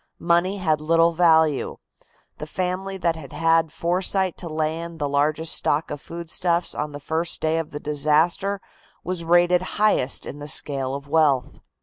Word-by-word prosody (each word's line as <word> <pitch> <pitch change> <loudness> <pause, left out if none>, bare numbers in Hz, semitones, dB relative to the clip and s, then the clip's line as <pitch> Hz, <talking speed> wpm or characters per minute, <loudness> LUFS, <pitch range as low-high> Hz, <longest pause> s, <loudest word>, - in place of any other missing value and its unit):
Money 175 +3 +1
had 160 -5 0
little 165 +2 +3
value. 160 -4 +3 0.6
The 150 - -6
family 185 +3 -3
that 170 -3 0
had 145 -5 -10
had 165 -1 +2
foresight 185 +2 0
to 170 - -5
lay 155 +1 -2
in 170 0 -8
the 145 -2 -2
largest 150 +3 +1
stock 150 +2 0
of 145 - -5
foodstuffs 170 +1 -2
on 150 0 -4
the 145 - -7
first 160 +3 -1
day 160 +1 0
of 160 - -4
disaster 155 +7 +1 0.4
was 180 -1 -3
rated 175 +1 +4 0.2
highest 210 -11 +2
in 145 - -8
the 145 - -7
scale 135 -2 0
of 140 0 -8
wealth. 145 -4 +1
165 Hz, 160 wpm, -23 LUFS, 150-175 Hz, 0.6 s, rated